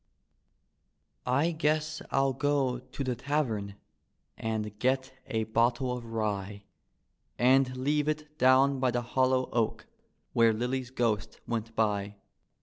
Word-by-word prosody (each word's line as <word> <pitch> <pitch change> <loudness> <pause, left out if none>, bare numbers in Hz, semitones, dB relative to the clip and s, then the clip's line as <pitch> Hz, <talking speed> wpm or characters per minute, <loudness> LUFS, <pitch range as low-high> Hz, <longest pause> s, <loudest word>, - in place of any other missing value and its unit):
I 140 +7 +2
guess 155 -1 0
I'll 135 0 +2
go 135 -2 +1
to 130 +2 -6
tlie 130 -2 -1
tavern 120 -8 -1 0.6
and 105 -2 -3
get 130 +2 0
a 110 -1 -1
bottle 120 +3 +1
of 120 -1 -7
rye 105 -3 -3 0.7
And 130 +1 +3
leave 145 +3 +1
it 150 0 -3
down 130 +1 +5
by 130 -1 +2
the 120 0 -1
hollow 130 +1 +1
oak, 115 -2 0 0.5
where 115 -1 +5
Lilly's 125 +3 -2
g^ost 115 -5 -1
went 115 -1 -3
by. 105 -2 0
125 Hz, 125 wpm, -29 LUFS, 110-135 Hz, 0.7 s, down